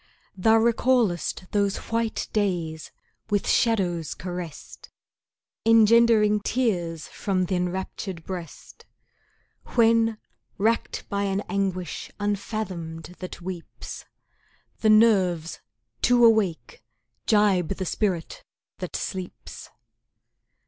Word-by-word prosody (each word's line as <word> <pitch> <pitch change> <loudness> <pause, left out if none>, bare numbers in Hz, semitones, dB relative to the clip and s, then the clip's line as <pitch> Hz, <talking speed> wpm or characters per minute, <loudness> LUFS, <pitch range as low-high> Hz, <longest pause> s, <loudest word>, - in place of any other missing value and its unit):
Thou 220 +4 +4
recallest 225 -6 +1
those 200 -1 +1
white 230 -1 -1
days 175 -7 -1 0.4
with 205 -1 0
shadows 180 - +1
caressed, 175 -3 -8 0.7
Engendering 225 -1 +5
tears 180 -9 -1
from 185 -2 -1
th' 180 - -9
enraptured 180 0 -3
breast, 175 -4 -9 0.9
When 225 -1 +4 0.4
racked 225 +3 0
by 200 0 -1
an 195 0 0
anguish 190 -4 -3
unfathomed 185 -5 -4
that 185 - -8
weeps, 180 -2 -7 0.7
The 220 - +2
nerves, 190 -7 +3 0.4
too 245 -1 +5
awake, 195 - +1 0.4
jibe 205 -5 +3
the 190 +1 -3
spirit 180 -3 -2 0.4
that - - -5
sleeps. 185 -2 -6
195 Hz, 90 wpm, -25 LUFS, 175-220 Hz, 0.9 s, Engendering